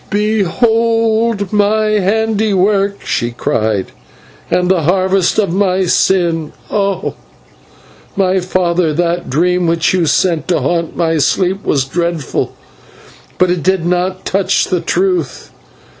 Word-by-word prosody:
"Behold 220 +1 +1
my 210 +1 +2
handiwork," 205 -1 +1
she 120 0 -2
said, 110 -3 -1 0.6
"and 180 0 +1
the 185 -3 +2
harvest 185 +2 +1
of 200 -6 +1
my 190 -1 +1
sin! 170 -3 +1 0.2
Oh! 200 -2 -1 1.0
my 190 -1 +1
father, 175 -3 0
that 175 +1 -1
dream 180 +5 +1
which 165 +1 +1
you 175 -3 +1
sent 170 0 +1
to 180 - +1
haunt 170 -2 -2
my 165 -2 +1
sleep 190 +6 0
was 135 -3 0
dreadful, 170 0 -2 0.8
but 185 -1 +2
it 180 -2 -1
did 185 0 0
not 180 +1 -1
touch 195 0 +1
the 180 -2 -1
truth. 180 -5 -1
185 Hz, 120 wpm, -14 LUFS, 170-200 Hz, 1.0 s, my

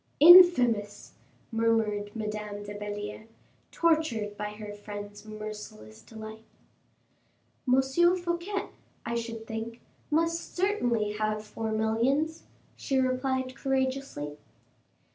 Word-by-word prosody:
"Infamous!" 255 - +7 0.4
murmured 225 -2 0
Madame 210 -1 -4
de 205 0 -7
Belliere, 205 +1 -6 0.4
tortured 310 -11 +1
by 210 0 -4
her 210 -1 -8
friend's 205 0 -8
merciless 210 - -8
delight. 220 0 -10 1.3
"M. 260 - +6 0.4
Fouquet, 350 +3 -3 0.4
I 235 - -2
should 230 -1 -4
think, 225 +1 -5 0.3
must 330 +2 0
certainly 245 - +1
have 215 0 -1
four 220 +1 -4
millions," 240 +9 0 0.3
she 270 - -1
replied, 260 0 0
courageously. 265 - -2
225 Hz, 95 wpm, -28 LUFS, 210-270 Hz, 1.3 s, Infamous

